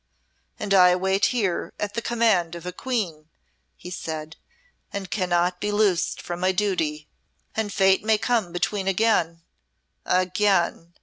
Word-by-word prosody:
"And 205 -1 -1
I 180 -2 +6
wait 190 +2 +1
here 205 -8 -1
at 205 -1 -3
the 235 - -2
command 220 -8 +1
of 170 0 -9
a 180 - -3
Queen," 180 -9 -3 0.5
he 180 - -10
said, 160 -2 -5 0.6
"and 195 -2 -6
cannot 180 -2 0
be 210 - -1
loosed 205 -4 +1
from 175 0 -5
my 185 +1 +2
duty. 165 -6 -1 0.5
And 220 -2 -1
Fate 190 -1 +3
may 220 0 +3
come 220 -5 0
between 190 +3 -2
again 180 -5 +1 0.6
again!" 180 -2 +1
185 Hz, 140 wpm, -24 LUFS, 175-210 Hz, 0.6 s, I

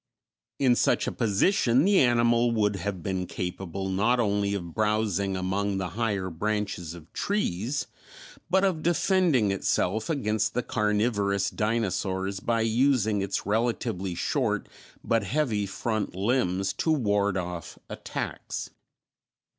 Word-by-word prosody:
In 130 -3 +4
such - - +2
a - - -1
position 120 - +2
the 200 -1 +5
animal 120 -1 +4
would 105 -3 +1
have 95 -1 -4
been 95 -1 -2
capable 95 +1 -4
not 110 +6 +2
only 100 -2 +1
of 85 -4 -6
browsing 105 -3 0
among 95 +2 -1
the 95 -2 -2
higher 100 -2 -2
branches 95 -2 -2
of 80 -2 -14
trees, 140 - -1 0.6
but 190 +2 +3
of 185 -5 +1
defending 170 - +2
itself 100 - 0
against 110 -9 0
the 125 - 0
carnivorous 105 -2 0
dinosaurs 100 -3 -1
by 115 +2 0
using 115 -2 +2
its 95 0 -2
relatively 110 -4 -1
short - - -1 0.4
but 115 -2 +1
heavy 110 -4 0
front 105 +1 -2
limbs 95 -2 0
to 160 - 0
ward 100 -8 +1
off 90 -2 -5
attacks. - - -5
105 Hz, 125 wpm, -27 LUFS, 95-120 Hz, 0.6 s, the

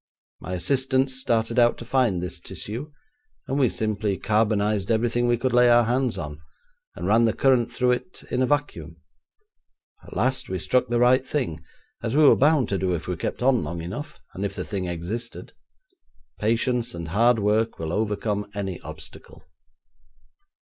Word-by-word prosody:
My 90 - -6
assistants 130 +6 +1
started 115 -2 0
out 120 0 +4
to 120 - -9
find 120 -8 +1
this 90 - -5
tissue, 125 +9 -6 0.6
and 135 +2 -1
we 130 -4 +4
simply 105 -2 -1
carbonised 105 -2 +1
everything 120 +1 +1
we 120 0 +2
could 125 +1 -1
lay 125 0 +6
our 120 0 +6
hands 125 +1 0
on, 75 0 -6 0.5
and - - -5
ran 115 +2 +4
the 110 - +2
current 130 -4 +2
through 125 -1 +1
it 125 +9 -4
in 125 - 0
a 130 - +2
vacuum. 85 - -2 1.1
At - - -9
last 130 +6 0
we 95 - -2
struck 125 +8 +1
the 120 +1 0
right 125 +2 +4
thing, 125 - -3 0.4
as 115 +4 -1
we 155 - +6
were 145 - +7
bound 145 -4 +3
to 95 - -1
do 90 -1 0
if 80 - -6
we 90 - -2
kept 85 - -4
on 125 -6 +3
long 85 +3 -5
enough, 145 - -7
and 95 - -5
if 100 - -3
the - - -4
thing 95 -3 -3
existed. 90 +8 -5 0.9
Patience 115 +1 0
and 85 -1 -6
hard 115 +6 +3
work 110 +2 +1
will 80 0 -4
overcome 105 0 -1
any 95 -3 -3
obstacle.' - - -11
115 Hz, 175 wpm, -24 LUFS, 100-125 Hz, 1.1 s, were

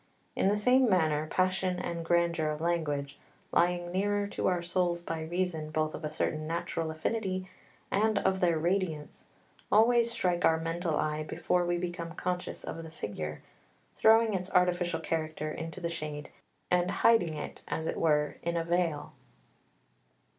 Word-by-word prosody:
In - - +2
the 205 +1 +3
same 250 +3 +4
manner 155 -5 +2
passion 185 +1 +1
and 170 -1 -3
grandeur 170 -2 +2
of 150 0 -3
language, 145 -4 -1 0.3
lying 175 0 +2
nearer 205 +2 +1
to - - -1
our 180 -2 +1
souls 175 -1 0
by 165 -1 -3
reason 165 -1 -2
both 155 0 -1
of - - -7
a 150 - -2
certain 155 0 -2
natural 165 0 -2
affinity 185 +3 -2 0.4
and 215 +2 +2
of 190 0 +1
their 170 -3 +3
radiance, 170 -3 -2 0.5
always 235 +2 +5
strike 180 -6 +1
our 160 0 +4
mental 165 -1 -1
eye 155 0 -1
before 175 +3 0
we 175 0 +1
become 175 -1 -4
conscious 180 0 -3
of 165 - -5
the 160 - -8
figure, 75 - -6 0.5
throwing 225 0 +5
its 185 -1 -2
artificial 175 -2 +2
character 155 -1 -2
into 165 +3 -6
the 170 - -2
shade 150 -3 -5 0.4
and 180 0 +3 0.2
hiding 175 -9 +5
it 150 - -6
as 160 - -3
it - - -2
were 150 -2 +2
in 170 0 -1
a 165 - 0
veil. 170 -3 -1
170 Hz, 160 wpm, -30 LUFS, 155-185 Hz, 0.5 s, always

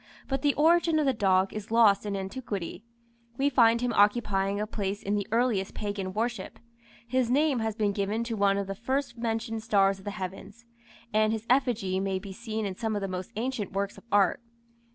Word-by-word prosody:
But 270 -1 -1
the 285 0 +2
origin 330 +1 +4
of 305 - +2
the 270 - +3
dog 190 -3 +2
is 215 -1 -6
lost 215 -3 +4
in 200 - -2
antiquity. 195 -2 -5 0.5
We 280 +1 +2
find 235 -2 +4
him 245 -1 0
occupying 205 -2 +2
a 210 - -1
place 205 -1 -4
in 200 - -1
the 205 -1 -1
earliest 225 -4 +1
pagan 205 -3 -3
worship; 235 +4 -3 0.5
his 255 -1 +1
name 280 0 +2
has 220 -1 -2
been 210 -2 +1
given 205 +3 -1
to 230 -1 -3
one 200 -1 +2
of 200 - -1
the 195 - -4
first 260 +6 -2
mentioned 225 -1 -2
stars 195 -3 +2
of 190 - -16
the - - -2
heavens, 200 +3 -7 0.5
and 215 0 +3
his 220 0 -3
effigy 230 -8 +1
may 195 0 -1
be 195 0 -8
seen 220 0 -4
in 190 -2 -3
some 220 +2 -2
of 205 - -2
the - - -1
most 185 -1 -5
ancient 225 -3 -3
works 200 +1 -2
of - - -14
art. 200 +2 +3
215 Hz, 205 wpm, -28 LUFS, 195-235 Hz, 0.5 s, origin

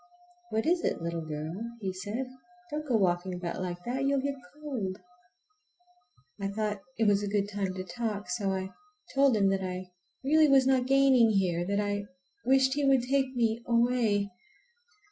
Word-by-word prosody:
"What 220 +1 -1
is 345 +1 +2
it, - - 0
little 170 0 -3
girl?" 155 +1 -4 0.3
he 190 -3 -3
said. 205 +7 -4 0.5
"Don't 305 0 -4
go 250 - +2
walking 180 -2 +1
about 175 0 -4
like 175 -1 -4
that—you'll 275 +4 0
get 280 +1 -1 0.2
cold." 250 -11 -4 1.4
I 195 - 0
thought 210 0 -2 0.2
it 225 -1 +2
was 205 0 +4
a 205 - -2
good 200 0 0
time 200 -2 -3
to 185 - -4
talk, 210 +1 -4
so 205 -5 -1
I 190 0 -3 0.4
told 275 -4 +4
him 195 -1 +4
that 195 0 0
I 185 0 -5 0.3
really 310 +3 +5
was 270 -1 +6
not 260 -1 +3
gaining 270 -4 +5
here, 185 -5 +1
and 175 +2 -2
that 200 0 +1
I 205 0 -2 0.4
wished 265 0 +4
he 290 +1 -1
would 270 -3 +4
take 265 0 0
me 230 -1 +1
away. 235 -4 +2
215 Hz, 175 wpm, -29 LUFS, 190-265 Hz, 1.4 s, was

